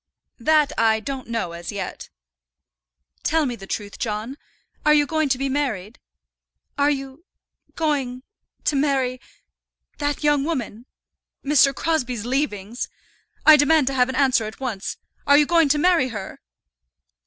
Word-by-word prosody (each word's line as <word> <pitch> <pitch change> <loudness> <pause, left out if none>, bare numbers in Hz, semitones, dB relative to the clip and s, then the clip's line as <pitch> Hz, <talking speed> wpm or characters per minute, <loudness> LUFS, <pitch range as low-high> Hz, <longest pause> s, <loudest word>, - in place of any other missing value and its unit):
"That 300 +4 +3
I 220 -1 +3
don't 265 +3 -6
know 230 -7 -2
as 170 0 -7
yet." 200 -2 -6 1.1
"Tell 320 0 +1
me 245 -3 -2
the 195 -4 -12
truth, 205 0 -5
John; 220 +4 -3 0.5
are 300 0 +5
you 295 -1 +4
going 315 0 0
to 260 - +2
be 275 +1 -1
married? 250 -7 -2 0.8
Are 285 0 +2
you 275 +1 -4 0.5
going 275 -6 -1 0.4
to 295 - +1
marry 270 -3 0 0.8
that 290 0 -2
young 295 -2 +3
woman, 250 -6 -4 0.6
Mr. 275 -1 +5
Crosbie's 250 -9 -1
leavings? 240 -4 -2 0.6
I 310 - +10
demand 295 0 +4
to 270 - -1
have 250 -1 +2
an 260 - -3
answer 260 -5 +3
at 215 - -8
once. 225 -7 -4 0.3
Are 285 0 +7
you 295 - +5
going 330 -2 +3
to 300 - +3
marry 335 -4 +3
her?" 205 -6 -7
270 Hz, 145 wpm, -22 LUFS, 230-295 Hz, 1.1 s, I